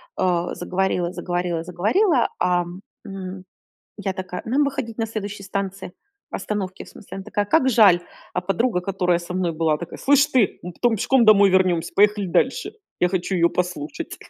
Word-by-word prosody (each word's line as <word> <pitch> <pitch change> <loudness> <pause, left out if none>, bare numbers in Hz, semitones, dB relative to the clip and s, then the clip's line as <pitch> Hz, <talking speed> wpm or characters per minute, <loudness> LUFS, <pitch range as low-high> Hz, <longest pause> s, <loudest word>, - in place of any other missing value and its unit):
А, 175 -1 0
заговорила, 180 -1 -1
заговорила, 175 -2 -2
заговорила, 235 - +2
ам, 175 0 0 0.2
м, 190 -1 -7 0.5
я 200 -2 -3
такая: 185 -1 -6
"Нам 265 +6 +2
выходить 270 -5 -3
на 225 - 0
следующей 210 -2 -6
станции, 195 -1 -4 0.4
остановке 195 -3 -4
в - - -14
смысле". 195 - -11
Она 195 - -6
такая: 205 +1 -2
"Как 265 +4 +3
жаль". 205 -7 +6 0.3
А 180 - -1
подруга, 195 +2 0
которая 180 -2 0
со 175 +1 -7
мной 180 -2 0
была, 160 -1 +1
такая: 170 - -8
"Слышь 285 0 +4
ты, 255 -9 +1
мы 180 - -6
потом 235 +5 +1
пешком 255 +4 +3
домой 205 -2 +7
вернемся, 180 -3 +2
поехали 205 0 +4
дальше, 170 - 0 0.3
я 180 - +4
хочу 185 +1 -2
её 170 -1 +3
послушать". 175 -5 -4
190 Hz, 170 wpm, -22 LUFS, 180-210 Hz, 0.5 s, домой